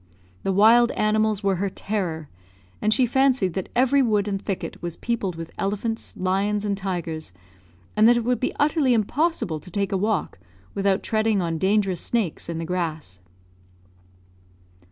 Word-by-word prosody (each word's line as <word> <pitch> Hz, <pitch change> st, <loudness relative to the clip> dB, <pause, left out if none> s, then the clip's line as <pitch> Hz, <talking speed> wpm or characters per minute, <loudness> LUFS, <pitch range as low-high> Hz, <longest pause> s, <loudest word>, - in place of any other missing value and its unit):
The 195 Hz, -, -1 dB
wild 225 Hz, +5 st, +6 dB
animals 215 Hz, -1 st, +1 dB
were 195 Hz, -2 st, +1 dB
her 195 Hz, +2 st, -1 dB
terror, 180 Hz, -7 st, -3 dB, 0.5 s
and 215 Hz, -, +2 dB
she 255 Hz, +3 st, +4 dB
fancied 255 Hz, -7 st, +2 dB
that 190 Hz, 0 st, -4 dB
every 265 Hz, +3 st, +4 dB
wood 210 Hz, -5 st, +1 dB
and 195 Hz, -1 st, -2 dB
thicket 195 Hz, -3 st, -5 dB
was 170 Hz, -1 st, -4 dB
peopled 215 Hz, -7 st, -2 dB
with 165 Hz, -1 st, -7 dB
elephants, 210 Hz, +3 st, -3 dB
lions, 200 Hz, +3 st, 0 dB
and 200 Hz, -1 st, 0 dB
tigers, 175 Hz, -, -4 dB, 0.6 s
and 215 Hz, +1 st, +6 dB
that 240 Hz, 0 st, +6 dB
it 235 Hz, -, 0 dB
would 250 Hz, 0 st, +1 dB
be 255 Hz, -, -2 dB
utterly 290 Hz, -4 st, +3 dB
impossible 230 Hz, -, 0 dB
to 165 Hz, -, -13 dB
take 200 Hz, +3 st, -2 dB
a 195 Hz, -, +1 dB
walk 200 Hz, -, -1 dB, 0.3 s
without 195 Hz, 0 st, +1 dB
treading 215 Hz, -2 st, +1 dB
on 165 Hz, -3 st, -2 dB
dangerous 195 Hz, -2 st, +1 dB
snakes 210 Hz, -9 st, -2 dB
in 165 Hz, -, -3 dB
the 165 Hz, -, -3 dB
grass. 160 Hz, -, -3 dB
200 Hz, 160 wpm, -24 LUFS, 180-225 Hz, 0.6 s, wild